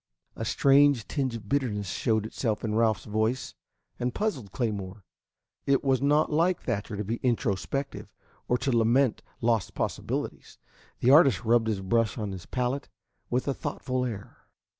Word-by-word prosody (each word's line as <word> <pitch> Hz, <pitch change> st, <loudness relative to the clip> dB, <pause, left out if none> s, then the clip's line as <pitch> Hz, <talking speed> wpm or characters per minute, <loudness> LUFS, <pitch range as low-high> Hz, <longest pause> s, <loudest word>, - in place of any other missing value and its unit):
A -, -, -4 dB
strange 140 Hz, -4 st, +4 dB
tinge 135 Hz, -5 st, -1 dB
of 110 Hz, -3 st, -8 dB
bitterness 105 Hz, -8 st, -1 dB
showed 110 Hz, -2 st, 0 dB
itself 110 Hz, -1 st, -2 dB
in 110 Hz, -2 st, -1 dB
Ralph's 110 Hz, -3 st, +2 dB
voice, 110 Hz, +4 st, -1 dB, 0.5 s
and 125 Hz, 0 st, -2 dB
puzzled 145 Hz, -, -2 dB
Claymore. 100 Hz, -5 st, -3 dB, 0.6 s
It 140 Hz, -1 st, +3 dB
was 135 Hz, -2 st, +2 dB
not 150 Hz, +3 st, +3 dB
like 170 Hz, +4 st, +2 dB
Thatcher 105 Hz, -2 st, -3 dB
to 105 Hz, -, -2 dB
be 115 Hz, +4 st, -2 dB
introspective, 125 Hz, +3 st, -2 dB, 0.4 s
or 125 Hz, -, +2 dB
to 135 Hz, -, -1 dB
lament 120 Hz, +2 st, +3 dB, 0.2 s
lost 115 Hz, -4 st, +1 dB
possibilities. -, -, -3 dB, 0.4 s
The 125 Hz, -, +5 dB
artist 135 Hz, -, +6 dB
rubbed 115 Hz, 0 st, +3 dB
his 105 Hz, -3 st, -1 dB
brush 115 Hz, +3 st, +1 dB
on 105 Hz, -3 st, -3 dB
his 95 Hz, -2 st, -8 dB
palette 125 Hz, +2 st, -2 dB, 0.4 s
with 125 Hz, +3 st, -1 dB
a 140 Hz, -, +1 dB
thoughtful 130 Hz, -1 st, -3 dB
air. 110 Hz, -5 st, -6 dB
120 Hz, 155 wpm, -27 LUFS, 105-135 Hz, 0.6 s, artist